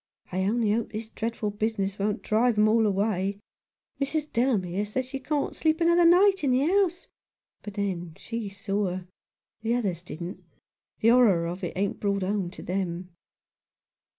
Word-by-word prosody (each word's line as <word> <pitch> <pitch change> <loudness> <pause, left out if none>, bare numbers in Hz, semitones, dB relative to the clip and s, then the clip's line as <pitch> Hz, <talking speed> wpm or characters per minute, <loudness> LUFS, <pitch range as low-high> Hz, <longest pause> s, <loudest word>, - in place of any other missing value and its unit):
I 185 +1 0
only 220 +1 +2
hope 230 +2 -1
this 220 0 -5
dreadful 225 -2 -3
business 205 -2 -2
won't 210 +2 -1
drive 230 +2 +2
them 210 0 +4
all 220 0 +4
away. 200 -1 0 0.6
Mrs. 300 +2 -1
Delamere 205 -6 +1
says 230 +5 -2
she 270 +1 -6
can't 285 +2 -2
sleep 315 0 +1
another 340 +1 +4
night 380 +2 +5
in 280 - +2
the 255 +2 +3
house; 360 0 +1 0.5
but 205 -1 -8
then 180 -5 -3
she 230 -3 -5
saw 200 0 -2
her. 180 0 -5 0.5
The 230 +2 +1
others 195 -9 -1
didn't. 175 +1 -7 0.6
The 225 - +5
horror 225 -9 +5
of 175 +3 -5
it 175 - -3
ain't 200 +1 -1
brought 200 -1 0
home 195 -1 -1
to 180 - -10
them." 180 -1 -3
210 Hz, 165 wpm, -27 LUFS, 195-250 Hz, 0.6 s, night